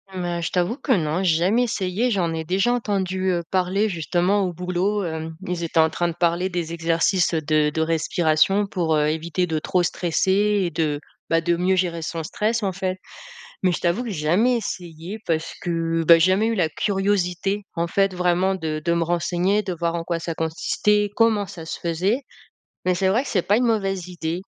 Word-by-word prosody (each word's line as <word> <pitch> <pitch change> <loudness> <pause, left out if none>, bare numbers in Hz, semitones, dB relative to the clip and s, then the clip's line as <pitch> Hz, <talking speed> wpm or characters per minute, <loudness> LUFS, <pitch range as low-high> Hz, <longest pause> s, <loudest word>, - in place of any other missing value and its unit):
Mmh 180 - -3
ben, 175 -1 -2
je - - -3
t'avoue 180 +8 0
que 265 -1 +1
non, 165 -1 0
j'ai 165 -4 +3
jamais 215 +8 +3
essayé. 220 +1 -1
J'en 175 -5 0
ai 160 0 -4
déjà 195 +7 +1
entendu, 190 -5 -1
heu, 170 -1 -1
parler, 190 +3 +1
justement 180 +3 +1
au 180 - -3
boulot, 180 +4 -1
hem, 160 -1 -4
ils 175 -1 -2
étaient 165 - 0
en 160 - +3
train 175 +2 -1
de 170 - -3
parler 175 +2 +1
des 170 -2 -3
exercices 170 +2 +1
de 155 -1 +2
de 160 - -1
respiration 165 +4 +2
pour, 165 -5 0
heu, 150 0 +2
éviter 165 +3 -1
de 160 -1 -1
trop 180 +3 0
stresser 175 +2 0 0.3
et 170 - -1
de, 150 -2 -1 0.3
bah, 165 0 +3
de 170 0 +1
mieux 185 +2 +2
gérer 175 -3 -1
son 165 0 -4
stress, 215 +6 -1
en 195 - 0
fait. 185 0 -2 0.7
Mais 185 -1 +3
je - - -3
t'avoue 180 +8 0
que - - -5
j'ai 165 -6 -4
jamais 235 +8 +3
essayé 180 -1 -6
parce 160 -1 -1
que, 165 -1 -1
bah, 170 - +8
j'ai 185 +3 +4
jamais 210 +4 +2
eu 230 - +1
la 170 -6 +1
curiosité 195 +1 0
en 170 0 0
fait 195 +2 +1
vraiment 180 +2 +1
de 155 -4 -3
de 170 - +1
me 170 - +1
renseigner, 175 +4 +1
de 185 -3 -3
voir 170 0 -2
en 165 - -3
quoi 170 -1 -2
ça 165 0 -4
consistait, 205 +6 0
comment 225 -3 +3
ça 170 -5 -9
se - - -5
faisait, 185 - 0 0.6
mais 180 0 +2
c'est 190 +1 +1
vrai 235 +8 +2
que - - -7
c'est 185 -5 +1
pas 205 - +2
une 245 - +2
mauvaise 195 -5 0
idée. 170 -1 -4
180 Hz, 215 wpm, -23 LUFS, 165-195 Hz, 0.7 s, bah